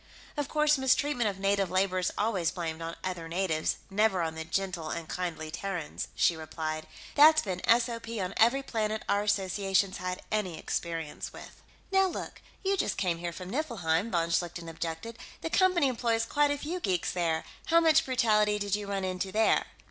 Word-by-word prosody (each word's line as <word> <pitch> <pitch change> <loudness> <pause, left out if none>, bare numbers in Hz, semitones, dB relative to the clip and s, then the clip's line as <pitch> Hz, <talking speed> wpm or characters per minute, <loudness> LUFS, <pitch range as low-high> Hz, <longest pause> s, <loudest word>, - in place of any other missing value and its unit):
"Of 290 -2 -1
course, 300 -2 +3
mistreatment 265 -3 +2
of 195 - -5
native 195 -1 +1
labor 185 0 +1
is 180 - 0
always 200 -6 +1
blamed 165 -2 -4
on 165 0 -4
other 180 -3 -4
natives, 165 -3 0 0.2
never 195 -3 +2
on 160 -1 -2
the 160 0 -5
gentle 175 -1 -2
and 165 -1 -4
kindly 160 -3 -4
Terrans," 180 -4 -4
she 170 - +3
replied. 155 0 -4 0.3
"That's 310 +2 +7
been 185 -3 -3
SOP 230 -1 +2
on 185 0 -2
every 240 +5 +4
planet 220 -3 -2
our 200 - +2
Association's 195 -1 +1
had 180 0 -4
any 190 -6 -1
experience 165 -2 -4
with." - - -12 0.3
"Now 385 0 +4
look; 355 - -6 0.2
you 395 0 +1
just - - 0
came 175 -4 0
here 170 0 -3
from 180 +2 -8
Niflheim," 220 - 0
von 170 -4 0
Schlichten 170 0 -1
objected. 165 +7 -5 0.2
"The 325 - -4
Company 365 -6 +4
employs 230 -2 0
quite 290 +4 +2
a 290 - 0
few 325 +6 -4
geeks 185 - 0
there; 165 -3 0 0.2
how 335 0 +6
much 320 -1 +5
brutality 215 -5 +3
did 205 -1 0
you 205 -1 -5
run 200 -1 -2
into 185 +1 -2
there?" 220 +2 +3
195 Hz, 180 wpm, -29 LUFS, 170-230 Hz, 0.3 s, That's